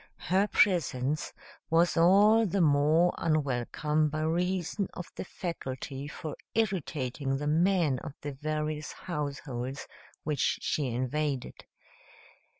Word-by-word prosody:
Her 195 +3 +4
presence 155 -9 +1 0.4
was 170 +2 +3
all 205 +6 +6
the 195 +2 0
more 155 +2 +4
unwelcome 150 0 +1
by 155 +1 -3
reason 180 +4 0
of 180 - -5
the - - -4
faculty 140 -6 -5
for 150 0 -6 0.2
irritating 145 - -1
the 145 - -4
men 165 -3 +2
of 145 - -8
the 145 - -4
various 155 +1 -3
households 140 -5 -4 0.4
which 150 -3 +1
she 145 -3 -1
invaded. 130 +3 -2
155 Hz, 110 wpm, -29 LUFS, 140-175 Hz, 0.4 s, all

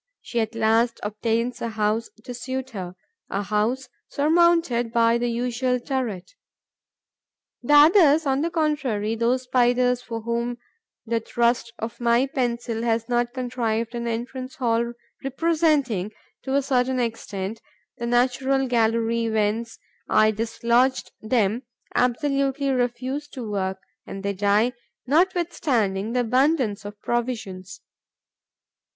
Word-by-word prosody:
She 240 - -2
at 220 0 -2
last 225 +1 +2
obtains 230 +3 -1
a 235 - -2
house 220 +1 -1
to 245 - -7
suit 260 +2 -5
her, 185 -4 -6 0.3
a 200 - -2
house 215 +6 0 0.2
surmounted 315 -6 +3
by 230 0 +3
the 240 0 0
usual 250 +1 0
turret. 240 -8 -3 1.3
The 270 +4 +1
others, 310 0 +6
on 270 0 +1
the 335 - 0
contrary, 290 -10 0
those 235 +3 +1
Spiders 250 0 +2
for 230 -2 -6
whom 235 +1 -2 0.5
the 230 0 0
thrust 235 +1 0
of 230 +2 -6
my 235 +2 +3
pencil 240 -4 -2
has 230 -1 0
not 240 -1 0
contrived 240 -3 -2
an 235 0 -3
entrance 255 +3 -4
hall 235 -1 0 0.3
representing, 280 - +1 0.3
to 265 0 -2
a 280 - +2
certain 260 -1 +1
extent, 220 -3 -3 0.4
the 235 - -3
natural 260 +2 +2
gallery 230 -1 +1
whence 220 +1 -1 0.3
I 215 0 +5
dislodged 235 +4 +1
them, 220 0 +1 0.3
absolutely 275 +2 +1
refuse 255 +3 -1
to 255 -5 -7
work; 190 -1 -1 0.3
and 195 - -7
they 200 0 -1
die, 205 +5 +2 0.3
notwithstanding 275 - +1
the 250 - +2
abundance 250 -4 +1
of 205 0 -8
provisions. 225 -6 -3
240 Hz, 125 wpm, -24 LUFS, 225-260 Hz, 1.3 s, others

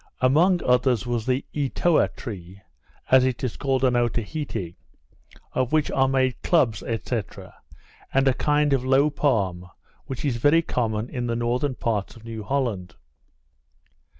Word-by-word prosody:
Among 165 +8 +3
others 125 -3 +2
was 120 -2 -2
the 130 +1 0
Etoa 150 +3 +2
tree, 95 -5 -8 0.5
as 130 0 +7
it 130 -1 -1
is 125 - -2
called 135 -2 0
at 125 -1 +2
Otaheite, 120 - -2 0.8
of 130 -1 0
which 155 -1 +1
are 135 0 +2
made 130 -2 0
clubs, 125 -11 +2
&c. 115 -1 -3 1.1
and 135 +1 +2
a 135 - +4
kind 150 +1 +1
of 130 -2 +1
low 135 +3 +3
palm, 95 -12 0 0.4
which 135 +2 -5
is 130 -5 0
very 145 +7 +4
common 110 -5 -1
in 125 -1 -4
the 115 - -1
northern 125 +3 -1
parts 110 -5 -2
of 115 - -15
New 115 -1 -6
Holland. 105 -8 -2
125 Hz, 150 wpm, -24 LUFS, 115-140 Hz, 1.1 s, as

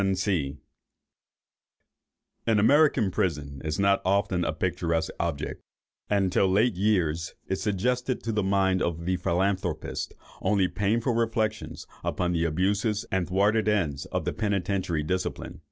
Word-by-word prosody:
An 95 -1 +1 2.4
American 135 -2 +4
prison 70 -6 -2
is 75 -1 -2
not 100 0 +3
often 95 -1 +1
a - - 0
picturesque 85 -1 -1
object, 80 -4 -3 0.5
and, 100 -3 +2
till 95 - +3
late 105 +6 +3
years, 85 -5 0
it 95 - -1
suggested 125 +6 -1
to 115 - -1
the 105 -1 +1
mind 95 -1 +2
of 85 -1 -2
the 90 0 +1
philanthropist 90 -1 -1 0.3
only 95 -1 +2
painful 110 +6 0
reflections 110 -2 -1 0.2
upon 90 -1 -1
the 85 -1 +1
abuses 100 +6 0
and 95 -2 0
thwarted 105 +4 +2
ends 85 -10 0
of - - -3
penitentiary 100 -6 0
discipline. 90 +4 -3
95 Hz, 125 wpm, -27 LUFS, 85-105 Hz, 2.4 s, American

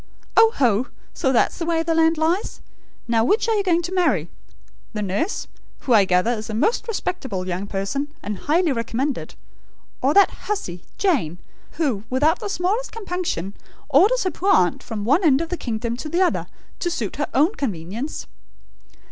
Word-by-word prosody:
"Oh 450 0 +7
ho! 240 -2 +2 0.3
So 265 - 0
that's 250 - +2
the 335 - -2
way 325 -1 +1
the 330 0 0
land 325 0 +3
lies! 330 +6 0 0.5
Now 230 -1 +2
which 415 - +2
are 450 - +2
you 420 - +2
going 345 -2 +2
to 350 - -4
marry? 285 - +1 0.6
The 210 -1 -2
nurse, 205 - -2 0.3
who, 255 - +1
I 205 -3 +6
gather, 185 +5 +2
is 220 -1 -4
a 215 - -3
most 440 - +1
respectable 265 - -3
young 185 +2 -3
person, 200 +9 -2 0.2
and 205 -2 -4
highly 330 +2 +2
recommended; 255 +3 -2 0.7
or 275 +3 +2
that 400 -1 +6 0.2
hussy, 180 - -3
Jane; 265 - +1 0.4
who, 270 -11 -1
without 295 +6 +2
the 410 - -4
smallest 400 +7 -1
compunction, 360 - -3 0.4
orders 395 - +4
her 370 - 0
poor 375 +5 -2
aunt 180 -2 +3
from 210 -2 -5
one 290 - +3
end 280 -5 +5
of 330 0 -3
the 355 - -1
kingdom 235 -5 -3
to 305 - -6
the 345 +4 +2
other, 360 - 0 0.3
to 350 - -1
suit 240 - -3
her 295 - -1
own 305 +9 +4
convenience?" 220 - -4
285 Hz, 180 wpm, -22 LUFS, 215-355 Hz, 0.7 s, Oh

